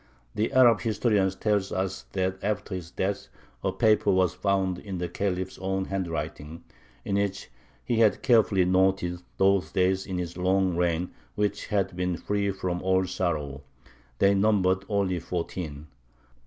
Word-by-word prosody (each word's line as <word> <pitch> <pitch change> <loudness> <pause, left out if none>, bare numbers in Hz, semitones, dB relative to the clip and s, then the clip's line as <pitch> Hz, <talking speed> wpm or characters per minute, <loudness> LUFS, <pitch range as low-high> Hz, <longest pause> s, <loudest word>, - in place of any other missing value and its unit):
The 110 +5 -1
Arab 125 -5 +5
historian 105 -3 +2
tells 100 0 -1
us 95 0 -3
that 95 0 -1
after 105 -1 -2
his 90 -3 -5
death 100 +2 -2 0.4
a - - +1
paper 110 -1 +3
was 95 -2 +2
found 95 -2 0
in 95 -3 -6
the 90 0 -2
Khalif's 95 +1 -3
own 95 0 -1
handwriting, 80 -3 -4 0.4
in 100 - 0
which 100 -8 -2 0.3
he 120 - 0
had 110 -2 +3
carefully 110 -7 +4
noted 95 -1 +1 0.2
those 95 -1 +3
days 95 0 +1
in 95 -2 -3
his 85 -1 -4
long 95 0 +2
reign 85 0 0 0.2
which 105 0 -1
had 100 -3 0
been 90 -1 -1
free 100 +1 -1
from 90 -2 -3
all 95 0 +2
sorrow; 75 -7 -2 0.6
they 100 +7 +4
numbered 95 -2 +2
only 100 -4 0
fourteen. 85 -3 -5
95 Hz, 150 wpm, -27 LUFS, 90-100 Hz, 0.6 s, Arab